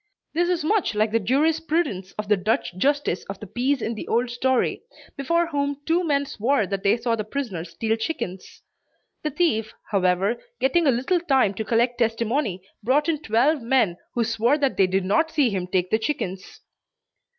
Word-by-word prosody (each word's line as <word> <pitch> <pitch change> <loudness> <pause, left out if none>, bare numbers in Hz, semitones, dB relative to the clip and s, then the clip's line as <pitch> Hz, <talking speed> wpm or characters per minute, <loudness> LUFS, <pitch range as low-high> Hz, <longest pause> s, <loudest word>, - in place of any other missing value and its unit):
This 345 +2 +1
is 350 -3 0
much 365 - +1
like 215 +1 +1
the 230 - +2
jurisprudence 290 - 0
of 210 -1 -5
the 210 - +4
Dutch 200 -1 -1
justice 280 -2 0
of 195 0 -7
the - - -8
peace 255 +6 -1
in 230 - -1
the 215 - -7
old 240 +1 +1
story, 255 +1 0 0.3
before 335 +5 +1
whom 285 -3 -2
two 340 +2 +2
men 285 -4 +1
swore 245 -1 0
that 195 0 -3
they 200 +3 +3
saw 230 0 0
the 215 - -3
prisoner 215 -7 -4
steal 200 +7 -2
chickens. 225 - -5 0.6
The 305 - -1
thief 265 -9 0 0.2
however, 190 +3 +1 0.2
getting 310 +5 +2
a - - +6
little 260 +9 +1
time 265 - +2
to 220 - -3
collect 240 +2 +1
testimony, 230 -3 0 0.2
brought 280 +8 +2
in 310 -2 0
twelve 270 +4 +2
men 230 -7 +2 0.2
who 240 - +2
swore 230 +5 +2
that 280 -3 0
they 190 - +4
did 190 0 0
not 320 - +2
see 285 -7 +2
him 185 -2 -2
take 180 0 0
the 220 - +3
chickens. 195 -7 -4
235 Hz, 185 wpm, -24 LUFS, 205-285 Hz, 0.6 s, a